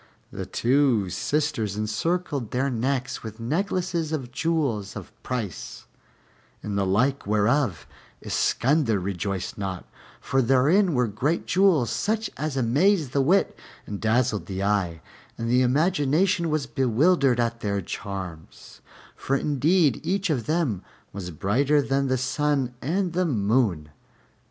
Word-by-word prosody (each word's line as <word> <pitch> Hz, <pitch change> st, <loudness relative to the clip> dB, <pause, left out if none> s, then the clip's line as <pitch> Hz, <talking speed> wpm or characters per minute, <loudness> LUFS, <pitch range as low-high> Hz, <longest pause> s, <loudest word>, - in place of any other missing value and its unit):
And -, -, -9 dB
the -, -, -4 dB
two 120 Hz, -7 st, +2 dB
sisters 145 Hz, -, -1 dB
encircled 130 Hz, -, -1 dB
their 130 Hz, +4 st, 0 dB
necks 130 Hz, +2 st, -2 dB
with 110 Hz, 0 st, -8 dB
necklaces 170 Hz, -, -1 dB
of 135 Hz, -6 st, -3 dB
jewels 130 Hz, -11 st, -1 dB
of -, -, -8 dB
price, 115 Hz, -8 st, -5 dB, 0.8 s
in 105 Hz, -, -4 dB
the 100 Hz, -1 st, +1 dB
like 125 Hz, +6 st, +1 dB
whereof 105 Hz, -, +1 dB, 0.3 s
Iskander 125 Hz, -5 st, +1 dB
rejoiced 95 Hz, +1 st, -3 dB
not, 95 Hz, -2 st, -4 dB, 0.3 s
for 135 Hz, -, +1 dB
therein 145 Hz, -, +3 dB
were 125 Hz, 0 st, +3 dB
great 125 Hz, +10 st, -1 dB
jewels 175 Hz, -, +3 dB
such 220 Hz, -, -1 dB
as 150 Hz, -1 st, -3 dB
amazed 145 Hz, -, +2 dB
the 140 Hz, -, +2 dB
wit 180 Hz, +9 st, +2 dB, 0.3 s
and 100 Hz, -1 st, -6 dB
dazzled 110 Hz, -1 st, +1 dB
the 95 Hz, 0 st, -3 dB
eye; 95 Hz, -5 st, 0 dB, 0.4 s
and 115 Hz, 0 st, -2 dB
the 125 Hz, +1 st, +4 dB
imagination 165 Hz, +6 st, +2 dB
was 155 Hz, -3 st, 0 dB
bewildered 135 Hz, +2 st, +2 dB
at 115 Hz, 0 st, 0 dB
their 100 Hz, -2 st, -1 dB
charms, 95 Hz, -4 st, -7 dB, 0.3 s
for 135 Hz, -, -1 dB
indeed 150 Hz, +1 st, +2 dB
each 190 Hz, +2 st, 0 dB
of 125 Hz, -7 st, -2 dB
them 155 Hz, -, 0 dB, 0.3 s
was 95 Hz, -3 st, -6 dB
brighter 125 Hz, -, +1 dB
than 140 Hz, -1 st, 0 dB
the 130 Hz, 0 st, +1 dB
sun 135 Hz, 0 st, 0 dB
and 180 Hz, +4 st, -1 dB
the 180 Hz, +1 st, +1 dB
moon. 105 Hz, -, +1 dB
130 Hz, 135 wpm, -25 LUFS, 105-155 Hz, 0.8 s, the